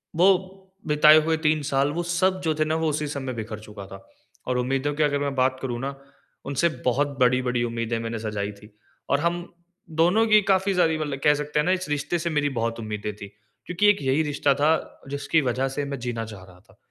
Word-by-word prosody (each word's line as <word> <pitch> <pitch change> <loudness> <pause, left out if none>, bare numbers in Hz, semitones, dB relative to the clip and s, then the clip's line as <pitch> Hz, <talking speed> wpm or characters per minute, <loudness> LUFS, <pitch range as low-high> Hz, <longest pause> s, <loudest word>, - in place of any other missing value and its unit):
वो 190 +2 +3 0.3
बिताए 150 +1 +7
हुए 160 0 +1
3 155 0 +2
साल, 140 0 +1
वो 175 +3 -2
सब 185 +2 +1
जो 160 -2 +1
थे 155 - +1
ना, 155 +1 0
वो 160 0 0
उसी 150 0 -2
समय 140 -2 -5
में 130 -2 -4
बिखर 110 -1 -6
चुका 105 -2 -10
था। 95 0 -12 0.4
और 125 - 0
उम्मीदों 135 +3 0
की 155 - +1
अगर 145 -1 +1
मैं 140 -1 -2
बात 130 0 +2
करूँ 120 -3 -3
ना, 140 +1 -4 0.5
उनसे 140 +5 +1 0.2
बहुत 140 +2 0
बड़ी-बड़ी 125 -1 +2
उम्मीदें 115 -1 -2
मैंने 115 0 -4
सजाई 105 -2 -3
थी 105 +1 -15 0.4
और 140 - +2
हम 170 +3 0 0.6
दोनों 185 +7 +4
की 215 -1 +6
काफ़ी 195 0 +2
सारी 160 -3 +3
मतलब 145 -3 -3
कह 150 - +6
सकते 150 0 -2
हैं 150 - +1
ना, 180 - +2
इस 185 -3 -1
रिश्ते 150 +4 -1
से 170 +1 -2
मेरी 150 -2 +1
बहुत 115 0 -1
उम्मीदें 105 -1 -4
थी, 100 -1 -9 0.4
क्योंकि 185 +4 +1
एक 205 - +2
यही 135 +2 +2
रिश्ता 145 -1 +1
था 155 +3 +3 0.3
जिसकी 145 +3 +1
वजह 130 +1 0
से 140 +2 -3
मैं 140 -2 -5
जीना 120 -2 -3
चाह 105 -4 -10
रहा 90 -1 -16
था। 100 +1 -25
140 Hz, 225 wpm, -24 LUFS, 120-160 Hz, 0.6 s, बिताए